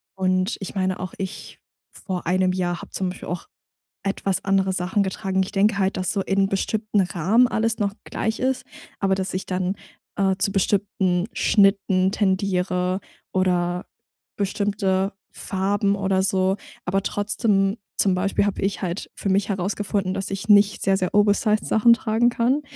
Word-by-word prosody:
Und, 185 +2 0
ich 195 - -7
meine 185 -1 0
auch, 185 -1 -5
ich 190 -1 -6 0.3
vor 180 -3 -5
1 185 +1 +2
Jahr 175 -2 -2
habe - - -12
zum 185 -1 -2
Beispiel 180 - -8
auch 175 0 -4 0.6
etwas 195 -1 -1
andere 195 -1 +2
Sachen 185 +3 0
getragen. 190 0 -1
Ich 190 - -7
denke 200 +1 +3
halt, 195 0 +1
dass 185 -1 -1
so 200 - -1
in 195 0 +1
bestimmten 210 +1 0
Rahmen 190 +7 +3
alles 225 0 0
noch 200 -1 0
gleich 220 0 -3
ist, 260 0 -1 0.3
aber 195 -1 +2
dass 190 0 -3
ich 185 - -3
dann, 185 +1 -1 0.4
äh, 195 -1 +2
zu 195 +1 +1
bestimmten 195 -2 +1
Schnitten 195 -2 +3
tendiere 185 -2 0 0.3
oder 180 -1 0 0.5
bestimmte 200 -1 0 0.2
Farben 200 +1 0
oder 190 -1 +1
so. 190 0 +1 0.3
Aber 195 +2 0
trotzdem 205 0 +1 0.2
zum 195 - +4
Beispiel 195 +2 +1
habe 205 - -2
ich 195 +1 -1
halt 175 +1 -3
für - - -4
mich 200 +2 +1
herausgefunden, 195 0 -1
dass 195 - -3
ich 195 +2 -5
nicht 205 0 +5
sehr, 195 0 +3
sehr 185 +1 -2
oversized 210 +1 +3
Sachen 235 +2 +5
tragen 230 +1 +2
kann. 245 +5 +1
195 Hz, 160 wpm, -23 LUFS, 185-205 Hz, 0.6 s, nicht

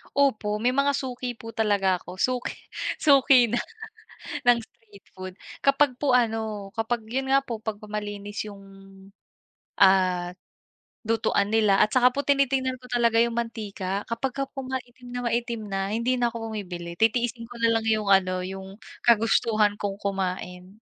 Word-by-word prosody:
Opo, 220 -7 +1
may 250 +3 +1
mga 280 +1 +3
suki 250 -3 -4
po 225 -1 -9
talaga 205 -4 +2
ako. 180 +1 -10
Suki 250 +2 0 0.5
suki 270 -4 +6
na 235 +2 0 0.9
ng 240 -1 +7
street 220 -3 -15
food. 185 -1 -8 0.3
Kapag 275 -1 +3
po 285 - +2
ano 220 -4 0
kapag 225 0 -2
yun 265 +4 -2
nga 275 - +6
po 225 -3 -5
pagkamalinis 210 -1 -5
yung, 200 -1 -12 1.2
ah, 185 -2 +4 0.7
lutuan 220 -2 +1
nila 210 -3 +4
at 215 - +3
saka 250 -1 +6
po 280 - -1
tinitingnan 270 -2 +2
ko 250 - -13
talaga 235 -2 +2
yung 235 0 -1
mantika. 205 -4 -3
Kapag 255 +3 -2
ka 275 - -1
po 270 - -6
maitim 250 -1 -7
na 245 - -2
maitim 235 -1 -1
na 195 0 -2
hindi 240 +3 +1
na 240 - +2
ako 225 -1 -5
bumibili 175 -5 -6
titiisin 230 +1 +1
ko 245 - -11
na 230 - +5
lang 225 - -6
yung 215 -2 +1
ano, 185 -1 +3
yung 190 +1 -7 0.3
kagustuhan 220 -2 +3
kong 200 -1 -2
kumain. 185 0 -4
225 Hz, 155 wpm, -25 LUFS, 200-245 Hz, 1.2 s, ng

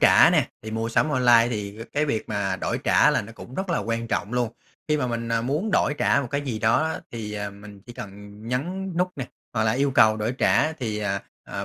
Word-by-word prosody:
trả - - +7
nè. - - +2
Thì 110 - -6
mua 115 +1 -2
sắm 120 +6 +2
online 120 -4 +5
thì 105 -2 -4
c - - -24
cái 150 +1 +1
việc 115 -7 -2
mà 100 -3 -1
đổi - - -2
trả - - +5
là - - +1
nó 110 +3 -10
cũng 125 +3 -11
rất 190 +1 -3
là 165 - +1
quan 115 0 -2
trọng 105 +4 -2
luôn. 120 -2 0 0.4
Khi 150 - +3
mà 125 - 0
mình, 115 -1 -3
ờ, 115 0 +1
muốn 150 - -1
đổi 150 - +2
trả 140 - +3
một 135 - -5
cái 140 - 0
gì 130 -6 -3
đó 115 +9 +2
đó - - -6
thì, 110 -2 -5
à, 105 -1 -4
mình 100 0 -13
chỉ 120 - -9
cần 105 - -7 0.4
nhấn 180 +9 -2
nút 180 +1 +2
nè, 130 - -4 0.3
hoặc 110 -2 +1
là 110 - +3
yêu 140 +3 +1
cầu 110 -4 +5
đổi 110 +3 -1
trả 155 - +3
thì, 110 -8 -3
à, 100 -2 -2 0.2
à, - - -5
115 Hz, 260 wpm, -25 LUFS, 110-140 Hz, 0.4 s, trả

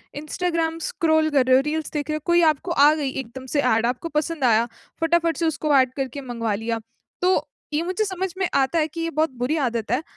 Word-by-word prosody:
Instagram 325 +2 -2
scroll 315 -1 +1
कर 280 -4 +3
रहे 255 0 +5
हो, 260 - +5
रील्स 310 0 -2
देख 295 0 -3
रहे 305 - 0
हो, 305 - -4
कोई 345 0 +4
आपको 305 +4 -6
आ 295 -1 +6
गई 290 -3 -2
एकदम 260 0 -7
से 290 - +3
ऐड, 230 -3 +2
आपको 250 +7 -2
पसंद 315 -2 -4
आया, 230 -1 +4 0.3
फटाफट 330 -1 +2
से 335 - 0
उसको 305 -1 +1
एड 255 -1 +3
करके 270 +1 -3
मँगवा 235 -4 -3
लिया। 225 +2 -2 0.4
तो 365 +1 +2 0.3
ये 300 - +1
मुझे 370 +4 -1
समझ 380 -1 -3
में 375 - +1
आता 275 +5 +2
है 310 - +1
कि 330 +2 -7
ये 330 - -1
बहुत 315 +1 +1
बुरी 250 +6 0
आदत 235 -6 -1
है, 250 +4 +1
300 Hz, 230 wpm, -23 LUFS, 255-330 Hz, 0.4 s, आ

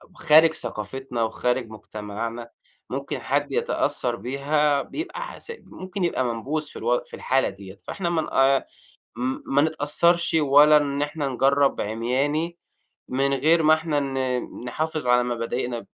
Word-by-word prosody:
خارج 160 +1 +5
ثقافتنا 120 +2 -4
وخارج 125 +1 -1
مجتمعنا، 110 +2 -6 0.4
ممكن - - -3
حد - - -1
يتأثّر - - 0
بيها 140 +5 +1
بيبقى 355 - -6
ح - - -7 0.2
ممكن 185 0 -7
يبقى 150 -6 +1
منبوذ 125 +6 -2
في - - -9
الو 120 +2 +1
في - - -23
الحالة 135 +1 +1
ديَّة 95 -1 -11
فإحنا 175 -3 -2
ما 135 -5 +3 0.6
ن 130 +2 -2
ما 140 +1 +3
نتأثّرش 160 +3 +1
ولا 150 +1 +6
إن 145 -1 +1
إحنا 150 -1 -2
نجرّب 135 +2 +2
عمياني، 135 +10 -1 0.5
من 135 +2 +1
غير 160 +5 +3
ما 155 +1 +6
إحنا 155 -2 -1
ن 130 -2 -1 0.3
نحافظ 155 +2 -3
على 125 0 +4
مبادئنا، 120 0 -3
135 Hz, 135 wpm, -24 LUFS, 125-155 Hz, 0.6 s, ولا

